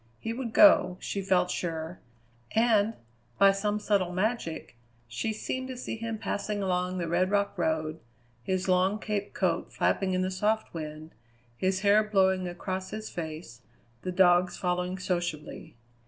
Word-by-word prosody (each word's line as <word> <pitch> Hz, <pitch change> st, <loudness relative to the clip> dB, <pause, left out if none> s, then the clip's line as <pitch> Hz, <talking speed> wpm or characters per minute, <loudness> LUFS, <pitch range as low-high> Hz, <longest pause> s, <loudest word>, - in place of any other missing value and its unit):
He 225 Hz, -, -4 dB
would 240 Hz, -1 st, -4 dB
go, 300 Hz, -, +6 dB
she 200 Hz, -, -3 dB
felt 185 Hz, -2 st, +2 dB
sure, 165 Hz, 0 st, -4 dB, 0.6 s
and, 225 Hz, -1 st, +3 dB, 0.4 s
by 195 Hz, 0 st, +7 dB
some 205 Hz, +2 st, -1 dB
subtle 200 Hz, -4 st, +1 dB
magic, 185 Hz, -, -2 dB, 0.3 s
she 120 Hz, -, -2 dB
seemed 260 Hz, +4 st, -4 dB
to 260 Hz, -1 st, -6 dB
see 245 Hz, -, -4 dB
him 225 Hz, 0 st, -4 dB
passing 205 Hz, -1 st, -3 dB
along 180 Hz, 0 st, -1 dB
the 170 Hz, -2 st, -2 dB
red 175 Hz, +3 st, +1 dB
rock 200 Hz, 0 st, +1 dB
road, 160 Hz, -2 st, -1 dB, 0.4 s
his 185 Hz, +9 st, -2 dB
long 185 Hz, +2 st, +3 dB
caped 210 Hz, -1 st, -4 dB
coat 175 Hz, -3 st, 0 dB
flapping 185 Hz, -1 st, +1 dB
in 185 Hz, -, +1 dB
the 185 Hz, -, -1 dB
soft 215 Hz, +4 st, 0 dB
wind, 155 Hz, -1 st, -7 dB, 0.4 s
his 190 Hz, +7 st, 0 dB
hair 205 Hz, +1 st, +5 dB
blowing 190 Hz, -3 st, +2 dB
across 185 Hz, +2 st, -4 dB
his 215 Hz, +1 st, -6 dB
face, 155 Hz, -7 st, -7 dB, 0.4 s
the 185 Hz, -, -3 dB
dogs 180 Hz, -1 st, +4 dB
following 180 Hz, 0 st, -1 dB
sociably. 175 Hz, -8 st, -4 dB
185 Hz, 155 wpm, -28 LUFS, 175-210 Hz, 0.6 s, by